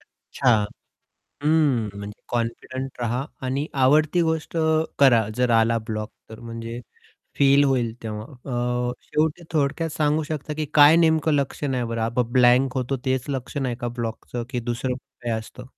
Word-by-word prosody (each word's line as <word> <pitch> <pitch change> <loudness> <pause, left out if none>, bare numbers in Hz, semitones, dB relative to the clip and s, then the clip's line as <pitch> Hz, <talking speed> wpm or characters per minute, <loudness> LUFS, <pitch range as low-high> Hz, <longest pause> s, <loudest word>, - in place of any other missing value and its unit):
अच्छा! 125 -4 0 0.9
हं, 145 -8 +2
म्हणजे 100 +1 -8
कॉन्फिडंट 120 +3 -4
रहा 120 +2 -1 0.2
आणि 135 +3 -1 0.2
आवडती 155 +5 +4
गोष्ट 160 0 -1 0.4
करा 120 -6 +5
जर 125 -1 +2
आला 115 +1 +2
ब्लॉक 110 -1 -3 0.2
तर 110 - -10
म्हणजे 115 0 -6 0.6
फील 140 0 +5
होईल 125 -5 +1
तेव्हा 105 -1 -5 0.7
अ, - - -3
शेवटी 155 +3 -1
थोडक्यात 155 +2 0
सांगू 150 0 +1
शकता, 150 0 -4
की 155 - -2
काय 150 +2 +8
नेमकं 160 -2 +3
लक्षण 140 0 -1
आहे 125 -1 0
बरं 115 -1 -1
ब्लँ 125 - +2
ब्लँक 125 +1 +4
होतो 130 +1 -1
तेच 130 -1 0
लक्षण 135 0 -3
आहे 125 - -1
का 120 - -2
ब्लॉकचं, 120 0 -5
की 125 -3 -2
दुसरं 120 +2 -2 0.3
काय 120 -1 -2
असतं? 110 +3 -10
130 Hz, 150 wpm, -24 LUFS, 115-145 Hz, 0.9 s, काय